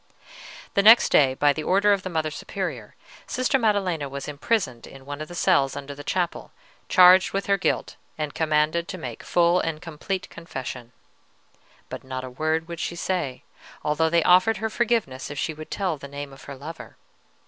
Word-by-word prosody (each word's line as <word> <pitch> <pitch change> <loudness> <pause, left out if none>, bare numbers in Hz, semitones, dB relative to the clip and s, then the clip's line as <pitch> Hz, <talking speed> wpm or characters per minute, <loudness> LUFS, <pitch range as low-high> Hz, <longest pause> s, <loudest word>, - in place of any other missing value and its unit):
"The 200 - +3
next 225 +3 +7
day, 130 -3 +4
by 145 +1 +3
the 155 - -4
order 200 +4 +3
of 200 - 0
the 185 - -5
Mother 160 -3 -1
Superior, - - -5 0.3
Sister 255 +2 +1
Maddelena 190 - 0
was 140 +1 -6
imprisoned 145 - -2
in 135 -1 -13
one 145 +1 -6
of 155 - -5
the 175 - -10
cells 155 -8 +2
under 145 0 -6
the 145 +1 -10
chapel, 175 +2 -2 0.4
charged 185 +1 +7
with 195 0 -1
her 200 - +3
guilt, - - -1 0.2
and 150 -2 -3
commanded 155 +2 +1
to 185 - -6
make 125 -9 -7
full 175 +1 +3
and 165 -3 -2
complete 170 +4 -5
confession. 130 -7 -7 1.0
But - - -8
not 130 -1 -5
a 130 - -7
word 155 +4 -1
would 170 -1 -7
she 170 - -3
say, 170 -8 -3 0.4
although 155 +2 +1
they 170 0 +3
offered 185 +4 +5
her 220 +2 -3
forgiveness 215 - -1
if 145 - -7
she 160 - -2
would 155 0 -10
tell 185 -6 -2
the 140 - -8
name 140 0 -7
of 135 - -14
her 140 - -8
lover. 155 +5 -10
160 Hz, 190 wpm, -24 LUFS, 140-185 Hz, 1.0 s, next